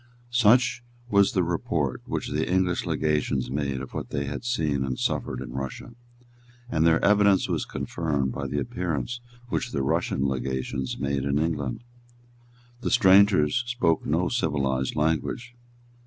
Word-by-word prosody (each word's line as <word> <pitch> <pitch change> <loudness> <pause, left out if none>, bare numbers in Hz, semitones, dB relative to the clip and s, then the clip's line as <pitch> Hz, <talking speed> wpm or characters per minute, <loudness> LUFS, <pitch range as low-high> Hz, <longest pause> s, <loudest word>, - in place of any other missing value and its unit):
Such 125 +2 +4 0.3
was 100 -1 +4
the 90 - +2
report 80 -5 -1
which - - -3
the - - -1
English 90 -1 +1
legations 75 -5 0
made 70 -2 -2
of 65 - -9
what - - -5
they 70 - -2
had 70 +1 -5
seen 80 - 0
and 65 -2 -3
suffered 65 - -1
in 65 -2 -7
Russia; 65 - -6 0.8
and 80 -4 +3
their 80 -1 +3
evidence 100 -2 +4
was - - -1
confirmed 70 -6 -2
by 70 -1 -4
the 70 +2 -3
appearance 90 - -3 0.3
which - - -1
the 70 - -1
Russian 65 0 0
legations 65 0 -3
made 70 -1 -1
in 70 +1 0
England. 75 - -2 1.0
The - - -2
strangers 100 -3 +5
spoke 120 -10 +1
no 85 +4 +1
civilised 70 - 0
language. 80 - -1
75 Hz, 145 wpm, -26 LUFS, 70-95 Hz, 1.0 s, strangers